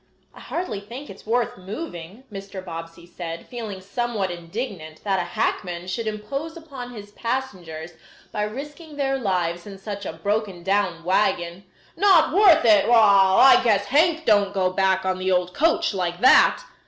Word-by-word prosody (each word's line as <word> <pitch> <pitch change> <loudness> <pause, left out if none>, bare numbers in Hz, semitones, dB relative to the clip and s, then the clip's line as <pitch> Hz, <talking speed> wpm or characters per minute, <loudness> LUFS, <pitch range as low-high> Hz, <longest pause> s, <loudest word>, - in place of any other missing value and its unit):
"I - - -14
hardly 290 - -4
think 245 +8 -9
it 195 - -12
is - - -19
worth 235 -4 0
moving," 195 - -8
Mr. 195 -1 -8
Bobbsey 165 0 -8
said, 170 -1 -8
feeling 220 -6 -7
somewhat 210 -1 -2
indignant 175 -2 -7
that 195 -2 0
a - - +1
hackman 175 0 -2
should 220 +5 -4
impose 275 +10 -5
upon 275 -7 -9
his 205 -3 -10
passengers 185 -10 -4 0.4
by 210 - -3
risking 295 +7 -8
their 270 -1 -1
lives 175 -5 -1
in 195 -1 -9
such 200 +1 -6
a - - -5
broken 200 +1 -2
down 190 -3 0
wagon. 180 0 0 0.3
"Not 375 -7 +4
worth 370 - +6
it? 210 -3 +5
Wall! 200 -5 +6
I 265 - +8
guess 205 -4 +2
Hank 320 +6 +2
don't 205 -2 +3
go 185 -1 +1
back 190 0 +1
on 185 0 -1
the 185 0 0
old 180 0 +1
coach 330 - +1
like 175 -2 -2
that. 260 - +6
200 Hz, 165 wpm, -23 LUFS, 180-245 Hz, 0.4 s, I